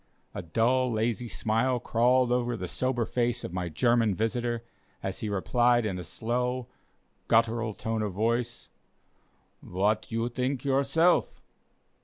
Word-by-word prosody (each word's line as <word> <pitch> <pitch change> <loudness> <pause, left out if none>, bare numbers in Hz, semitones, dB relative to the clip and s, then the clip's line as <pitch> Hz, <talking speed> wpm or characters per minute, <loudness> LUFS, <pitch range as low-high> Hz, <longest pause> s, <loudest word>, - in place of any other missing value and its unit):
A - - -4
dull, 120 +9 +1
lazy 115 +1 -1
smile 115 +3 0
crawled 120 +2 +2
over 120 -1 0
the 90 - -4
sober 120 +7 -1
face 120 0 -1
of 90 - -6
my 90 -1 -2
German 115 +4 +2
visitor, 120 +2 -1 0.4
as 95 -1 -3
he 110 - -3
replied 120 +4 +2
in 95 -4 -2
a - - -5
slow, 125 +5 -2 0.6
guttural 115 -1 +2
tone 110 -1 -2
of 105 -2 -2
voice: 115 +4 -1 0.9
"What 105 +5 -1
you 115 +1 0
think 125 +2 -2
yourself?" 140 +6 +2
120 Hz, 135 wpm, -28 LUFS, 110-125 Hz, 0.9 s, crawled